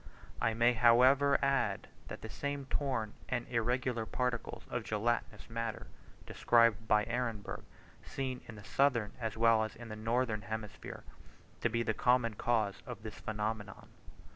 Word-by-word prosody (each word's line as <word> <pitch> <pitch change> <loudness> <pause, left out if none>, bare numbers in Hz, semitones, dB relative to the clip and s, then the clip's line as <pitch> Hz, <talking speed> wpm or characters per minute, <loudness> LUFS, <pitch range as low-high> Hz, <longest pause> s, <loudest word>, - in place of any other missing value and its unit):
I 115 - +2
may 120 +2 +4
however 130 +4 +5
add, 135 -1 +1 0.2
that - - -8
the - - -6
same 140 -1 -3
torn 130 -7 -1 0.2
and 120 -2 -2
irregular 120 0 0
particles 125 -1 -2
of 120 -2 -3
gelatinous 110 0 -1
matter, 115 -1 -4 0.4
described 115 -2 +3
by 105 0 +4
Ehrenberg, 115 -3 -3 0.4
seem 130 -2 -4
in 115 - -9
the 105 - -11
southern 115 -2 +2
as 115 -2 -3
well 115 -1 +5
as 110 - -5
in 120 0 -10
the 110 - -5
northern 115 0 0
hemisphere, 110 +1 -6 0.6
to 120 - +1
be 115 +1 0
the 110 - 0
common 125 -1 +2
cause 110 -2 0
of 115 -4 -7
this 110 -2 -7
phenomenon. 105 -2 -4
115 Hz, 150 wpm, -33 LUFS, 110-125 Hz, 0.6 s, however